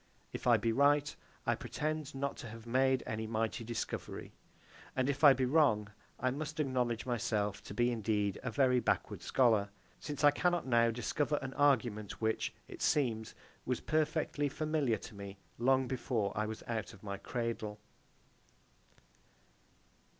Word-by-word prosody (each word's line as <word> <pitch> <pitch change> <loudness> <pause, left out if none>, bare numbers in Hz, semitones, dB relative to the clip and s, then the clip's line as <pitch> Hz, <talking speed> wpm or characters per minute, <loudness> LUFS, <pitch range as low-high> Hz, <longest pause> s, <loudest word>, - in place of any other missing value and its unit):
If - - -4
I 120 -2 +7
be 115 +2 0
right, 145 +4 +3 0.3
I - - +3
pretend 155 -1 -3
not 140 +1 -2
to - - -7
have 115 +1 -10
made 130 +2 +2
any 110 -1 -3
mighty 115 +1 -1
discovery. 115 0 -5 0.6
And 130 0 +1
if 140 +1 -1
I 145 -2 +10
be 130 0 0
wrong, 125 -7 +3 0.3
I 130 0 +1
must 155 +3 -5
acknowledge 125 -5 0
myself 110 -5 -1
to 100 - -8
be 120 +2 +3
indeed 105 -3 0
a 125 - -3
very 125 +1 +3
backward - - -1
scholar; 110 -6 +3 0.3
since 145 -1 -5
I 145 - +8
cannot 175 +4 +1
now 115 -2 +4
discover 140 +6 0
an 130 0 -5
argument 120 -8 +1
which, 110 0 0 0.2
it - - -10
seems, 115 -6 +1 0.3
was 125 -1 -1
perfectly 155 -1 0
familiar 150 -5 0
to 105 - -10
me 100 -1 -8 0.2
long 130 +1 +3
before 115 -6 -1
I 105 +1 0
was 110 +1 -6
out 115 -2 -3
of 100 - -16
my 100 -1 -4
cradle. 115 -2 -3
125 Hz, 155 wpm, -34 LUFS, 110-140 Hz, 0.6 s, I